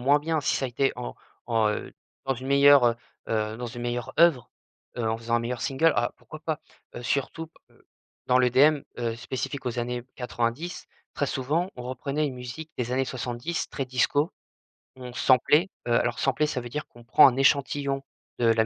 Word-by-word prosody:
moins 140 Hz, +4 st, +4 dB
bien. 160 Hz, +1 st, -1 dB
Si -, -, +1 dB
ça 135 Hz, -, -2 dB
a -, -, -1 dB
été 135 Hz, +3 st, +1 dB
en -, -, -5 dB, 0.3 s
en 110 Hz, -2 st, +2 dB
heu, 105 Hz, -, -3 dB, 0.3 s
dans 135 Hz, 0 st, 0 dB
une 130 Hz, +2 st, -7 dB
meilleure, 140 Hz, -1 st, +7 dB
heu 120 Hz, -1 st, +4 dB, 0.3 s
heu, 110 Hz, 0 st, -1 dB
dans 120 Hz, 0 st, -5 dB
une 120 Hz, +1 st, -7 dB
meilleure 120 Hz, +2 st, -3 dB
œuvre, 165 Hz, -8 st, +4 dB, 0.5 s
heu, 115 Hz, -2 st, -1 dB
en 110 Hz, -, 0 dB
faisant 115 Hz, +1 st, -1 dB
un -, -, +2 dB
meilleur 120 Hz, +1 st, -3 dB
single. 150 Hz, +4 st, +3 dB
Ah, 120 Hz, -, +1 dB
pourquoi 155 Hz, -, -12 dB
pas? 160 Hz, -1 st, -2 dB, 0.4 s
Heu, 120 Hz, -, -6 dB
surtout 140 Hz, +6 st, -2 dB
p 165 Hz, -, -29 dB, 0.2 s
heu, -, -, -26 dB, 0.4 s
dans 125 Hz, 0 st, +4 dB
l'EDM, 135 Hz, +4 st, +5 dB, 0.2 s
heu, 115 Hz, -1 st, -1 dB
spécifique 130 Hz, +3 st, -5 dB
aux 125 Hz, -1 st, -3 dB
années 120 Hz, 0 st, -2 dB
90, 125 Hz, +7 st, -3 dB, 0.3 s
très 145 Hz, -, 0 dB
souvent, 155 Hz, +9 st, -1 dB
on 125 Hz, -, -7 dB
reprenait 140 Hz, +4 st, -2 dB
une 130 Hz, -, -4 dB
musique 125 Hz, +6 st, -8 dB
des 125 Hz, -1 st, -2 dB
années 130 Hz, +1 st, +1 dB
70 125 Hz, +5 st, -3 dB
très 135 Hz, -, -3 dB
disco, 130 Hz, +5 st, +1 dB, 0.7 s
on 125 Hz, -1 st, -8 dB
samplait. 150 Hz, -, +4 dB, 0.2 s
Heu, 120 Hz, -, +2 dB
alors, 120 Hz, 0 st, +1 dB
sampler, 135 Hz, +3 st, +2 dB
ça 150 Hz, -4 st, -2 dB
veut 120 Hz, -, -7 dB
dire 150 Hz, +4 st, -4 dB
qu'on 120 Hz, -1 st, -17 dB
prend 150 Hz, -, +7 dB
un 130 Hz, 0 st, +1 dB
échantillon 140 Hz, 0 st, +2 dB, 0.4 s
de 120 Hz, -, +3 dB
la 115 Hz, -1 st, +4 dB
130 Hz, 205 wpm, -26 LUFS, 120-145 Hz, 0.7 s, meilleure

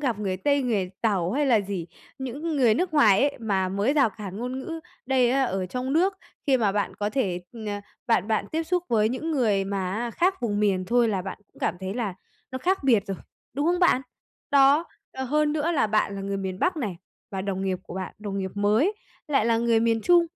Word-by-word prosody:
gặp 245 Hz, -7 st, 0 dB
người 195 Hz, -3 st, -2 dB
Tây, 280 Hz, +8 st, +1 dB
người 200 Hz, -7 st, 0 dB
Tàu 195 Hz, -5 st, +1 dB
hay 290 Hz, +1 st, +1 dB
là 230 Hz, -5 st, +4 dB
gì, 195 Hz, -4 st, -4 dB, 0.3 s
những 285 Hz, +5 st, -3 dB
người 235 Hz, -5 st, +4 dB
nước 355 Hz, 0 st, -1 dB
ngoài 215 Hz, -9 st, +6 dB
ấy, 285 Hz, -1 st, +1 dB
mà 195 Hz, -5 st, 0 dB
mới 200 Hz, +8 st, +1 dB
rào 275 Hz, -7 st, +3 dB
cản 195 Hz, -2 st, -8 dB
ngôn 250 Hz, +2 st, -3 dB
ngữ, 325 Hz, +4 st, -5 dB, 0.3 s
đây 255 Hz, -2 st, +3 dB
á, 270 Hz, +1 st, +2 dB
ở 190 Hz, -5 st, -2 dB
trong 255 Hz, +7 st, -3 dB
nước, 370 Hz, +5 st, +2 dB, 0.3 s
khi 270 Hz, -2 st, +5 dB
mà 210 Hz, -5 st, +1 dB
bạn 205 Hz, 0 st, -1 dB
có 205 Hz, 0 st, -1 dB
thể, 190 Hz, -8 st, -1 dB
ờ, 230 Hz, -, -10 dB, 0.5 s
bạn 225 Hz, -3 st, +2 dB
bạn 215 Hz, -2 st, +1 dB
tiếp 325 Hz, +1 st, 0 dB
xúc 355 Hz, +1 st, -1 dB
với 215 Hz, -2 st, +3 dB
những 260 Hz, +7 st, -3 dB
người 220 Hz, -10 st, +2 dB
mà 195 Hz, -2 st, -2 dB
á, 235 Hz, +3 st, -2 dB
khác 370 Hz, +5 st, +1 dB
vùng 210 Hz, -3 st, -1 dB
miền 190 Hz, -3 st, +2 dB
thôi 240 Hz, +3 st, +3 dB
là 195 Hz, -4 st, -1 dB
bạn 190 Hz, -, -6 dB
cũng -, -, -23 dB
cảm -, -, 0 dB
thấy 190 Hz, +1 st, -4 dB
là 220 Hz, -6 st, -2 dB, 0.4 s
nó 260 Hz, -, -4 dB
khác 365 Hz, +1 st, 0 dB
biệt 225 Hz, -7 st, +3 dB
rồi, 195 Hz, -, -3 dB, 0.4 s
đúng 285 Hz, +2 st, 0 dB
không 350 Hz, +1 st, +2 dB
bạn? 350 Hz, -8 st, +4 dB, 0.5 s
Đó, 280 Hz, +3 st, +5 dB, 0.3 s
ờ, 265 Hz, 0 st, -4 dB
hơn 300 Hz, +3 st, +1 dB
nữa 315 Hz, +2 st, 0 dB
là 295 Hz, -, +2 dB
bạn 215 Hz, -1 st, +1 dB
là 195 Hz, -, -5 dB
người 195 Hz, 0 st, -3 dB
miền 190 Hz, -1 st, -4 dB
Bắc 360 Hz, -, +1 dB
này, 210 Hz, -, -3 dB, 0.3 s
và 190 Hz, -1 st, -3 dB
đồng 190 Hz, -1 st, -2 dB
nghiệp 190 Hz, -1 st, -1 dB
của -, -, -10 dB
bạn, 190 Hz, -1 st, -5 dB
đồng 200 Hz, -2 st, -4 dB
nghiệp 190 Hz, -1 st, -3 dB
mới 215 Hz, -, +2 dB, 0.4 s
lại 275 Hz, -7 st, +2 dB
là 230 Hz, -1 st, +3 dB
người 230 Hz, -1 st, +3 dB
miền 225 Hz, 0 st, +2 dB
Trung, 345 Hz, -1 st, +5 dB
230 Hz, 235 wpm, -25 LUFS, 200-280 Hz, 0.5 s, ngoài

